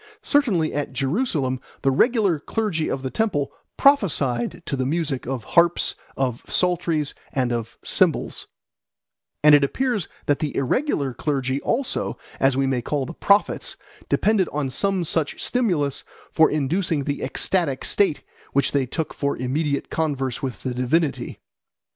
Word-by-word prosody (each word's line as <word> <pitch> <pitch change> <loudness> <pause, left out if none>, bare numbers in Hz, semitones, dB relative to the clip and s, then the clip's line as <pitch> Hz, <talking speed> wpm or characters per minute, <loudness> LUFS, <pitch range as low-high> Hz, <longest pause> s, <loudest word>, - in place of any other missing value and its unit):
Certainly 215 - +2
at 145 -2 -3
Jerusalem 135 - 0 0.2
the 135 - +4
regular 200 - +3
clergy 180 -2 -1
of 135 - -3
the 130 - -3
temple 145 -11 0 0.3
prophesied 160 - +2
to 140 - -2
the 130 - -1
music 145 -2 -2
of 130 -3 -3
harps, 170 0 +3 0.2
of 125 -3 -1
psalteries, 170 -4 +1 0.2
and 125 -3 0
of 120 0 -4
cymbals; - - 0 1.0
and 150 0 +8
it 145 -1 +7
appears 235 - 0 0.2
that 145 - +2
the 150 -3 -3
irregular 140 - 0
clergy 135 -1 -1
also, 255 +2 -1 0.2
as 135 -1 +3
we 135 - +2
may 130 -2 0
call 140 +3 -2
the 165 - -7
prophets, 200 +4 +2 0.3
depended 210 -4 +2
on 145 -3 -2
some 195 +5 +1
such 160 -2 0
stimulus 175 - 0 0.3
for 160 - +5
inducing 155 +2 0
the 145 +1 -3
ecstatic 140 +1 0
state 195 -7 +2 0.3
which 140 -1 +3
they 135 -3 +1
took 160 +5 -3
for 140 -1 -1
immediate 140 +3 -1
converse 140 -4 -1
with 130 -4 -4
the 130 - -2
divinity. 135 +5 0
145 Hz, 145 wpm, -23 LUFS, 135-180 Hz, 1.0 s, and